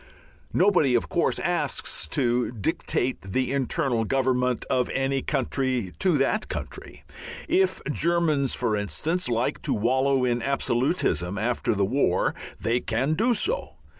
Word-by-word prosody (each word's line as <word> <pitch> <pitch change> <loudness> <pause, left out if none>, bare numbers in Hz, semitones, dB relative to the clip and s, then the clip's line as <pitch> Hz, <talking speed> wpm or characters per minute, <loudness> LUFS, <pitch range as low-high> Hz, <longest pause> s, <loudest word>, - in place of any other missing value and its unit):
Nobody, 180 -9 +3
of 120 - 0
course, - - +1
asks - - -1
to 120 - 0
"dictate 125 +1 -1
the 130 +7 -1
internal 130 -3 0
government" 125 0 0
of 125 -1 +1
any 135 0 0
country 130 - -1
to 180 -5 +3
that 175 +11 0
country. - - -7 0.4
If 370 +4 +2
Germans, 155 -4 +1
for 115 -4 0
instance, 155 - -1
like 120 +1 -1
to - - 0
wallow 130 +4 +2
in 120 -1 0
absolutism 120 - 0
after 115 +1 0
the 100 -1 +2
war 130 +8 +1 0.3
they 115 +2 +1
can 125 +6 0
do 230 +8 +2
so. 445 - -2
130 Hz, 135 wpm, -25 LUFS, 120-145 Hz, 0.4 s, Nobody